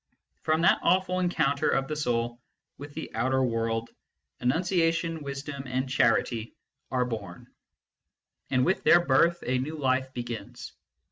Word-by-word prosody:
From 160 +1 +1
that - - +5
awful 185 +1 +2
encounter 155 -5 +1
of 135 0 +1
the 155 - -3
soul 120 -4 -1 0.4
with 145 +1 -9
the - - -6
outer 130 +3 +1
world, 115 -1 -1 0.5
enunciation, 165 +3 +1
wisdom, 140 0 -6
and 130 +1 -1
charity 115 -3 +1 0.3
are 125 -1 +1
born; 100 -7 -7 1.0
and 130 -1 +2
with 185 - +2
A - - -24
FREE - - +3
MAN 175 - +7
S - - -13
WORSHIP 155 +6 +5
55 - - -22
their 150 - -8
birth - - +2
a 125 - +1
new 155 +3 -5
life 130 -1 0
begins. 120 -2 -7
135 Hz, 165 wpm, -27 LUFS, 120-160 Hz, 1.0 s, MAN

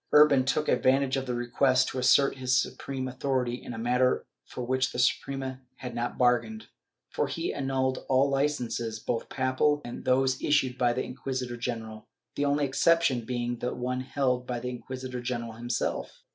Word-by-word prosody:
Urban 150 -3 +7
took 150 +3 0
advantage 135 +1 +3
of 135 -1 -2
the 125 - -1
request 130 +2 +2
to 130 - -4
assert 135 +2 +4
his 130 -1 +2
supreme 130 -1 -3
authority 130 -1 -1
in 125 - -7
a 115 - -6
manner 125 +2 +1 0.2
for 125 - -6
which 130 +2 0
the - - -6
Suprema 130 +1 0
had 125 -1 -7
not 120 +1 -3
bargained, 125 - +1 0.5
for - - 0
he 345 - -3
annulled 130 -1 -1
all 135 +1 +4
licences, 135 -5 -1
both 115 +1 -3
papal 130 +3 +1
and 120 - -7
those 130 0 +2
issued 135 -4 +2
by 125 -1 +2
the 125 +2 -1
inquisitor 130 -1 -4
general, 115 -3 -5 0.3
the 145 - 0
only 145 0 +2
exception 135 -3 +2
being 120 0 -2
the 125 - -2
one 125 +1 -2
held 130 -2 -1
by 125 -1 -2
the 125 +1 -4
inquisitor 130 0 -6
general 120 -2 -3
himself. 120 +1 -3
130 Hz, 175 wpm, -28 LUFS, 120-135 Hz, 0.5 s, Urban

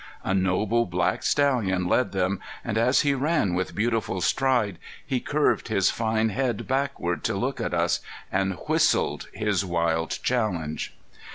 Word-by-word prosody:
A - - 0
noble 95 +5 +1
black 90 0 0
stallion 115 -11 +1
led 125 +7 +2
them, 95 0 0 0.3
and 110 - -2
as 120 +4 +4
he 145 -1 +2
ran 140 - +1
with 90 +1 -2
beautiful 110 -3 0
stride 120 -2 +1 0.3
he 130 - 0
curved 150 +4 +1
his 100 -4 +2
fine 110 0 0
head 120 0 -2
backward 130 -10 -1
to - - 0
look - - -2
at - - -1
us, - - +1 0.3
and 95 -1 0
whistled - - +2
his 105 -3 0
wild 85 -2 0
challenge. 90 -11 -1
105 Hz, 150 wpm, -25 LUFS, 95-125 Hz, 0.3 s, as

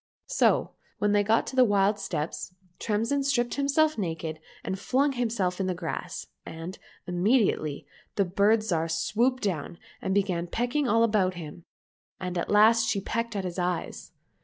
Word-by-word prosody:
So - - +2 0.3
when 205 0 +1
they 205 0 +4
got 220 +3 +2
to - - -6
the 255 - +7
wild 205 -2 +3
steppes, 170 0 -4 0.2
Tremsin 230 +6 0
stripped 245 -3 +1
himself 285 0 +2
naked 160 -3 -3 0.2
and 190 - -3
flung 270 +7 +2
himself 220 -8 -1
in 190 - 0
the 185 - -1
grass, 170 0 -5 0.2
and, 165 +3 -8 0.3
immediately, 180 - +1 0.3
the 200 - +2
Bird 200 +5 +3
Zhar 165 -6 0
swooped 235 +10 +1
down 170 -4 -2 0.2
and 190 - -1
began 185 -4 0
pecking 245 - 0
all 230 0 +4
about 205 -5 +2
him, 165 0 -9 0.5
and 180 -1 -4
at 170 - -2
last 220 +2 +5
she 205 - +1
pecked 230 +3 -3
at 195 - -1
his 180 0 -4
eyes. 180 -1 -3
200 Hz, 160 wpm, -27 LUFS, 180-230 Hz, 0.5 s, the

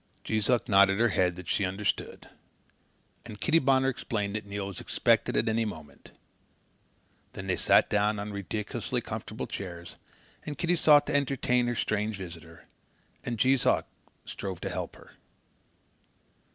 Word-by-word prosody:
Jees 110 0 -1
Uck 125 -2 +2
nodded 100 0 +5
her 120 0 +4
head 90 -3 +1
that 90 -2 -10
she 100 - 0
understood, 95 +2 -2 1.0
and 105 - -10
Kitty 165 -1 +3
Bonner 135 -2 +3
explained 105 -5 -3
that 110 -1 -5
Neil 100 0 -4
was 100 -3 -6
expected - - +1
at 115 - +1
any 110 +1 +1
moment. 80 -10 -8 1.2
Then 95 - -7
they 95 -1 0
sat - - +4
down 105 +1 +1
on 105 0 -5
ridiculously 100 +2 -3
comfortable - - -5
chairs, 85 -3 -7 0.5
and 150 -2 -6
Kitty 175 +3 +1
sought 150 -2 +6
to - - -2
entertain 130 -3 +1
her 120 - -1
strange 105 0 -1
visitor, 85 -3 -10 0.6
and 120 - -3
Jees 130 +3 +3
Uck - - +2 0.4
strove 95 -3 -5
to - - -3
help - - -5
her. - - -16
105 Hz, 150 wpm, -28 LUFS, 95-120 Hz, 1.2 s, sought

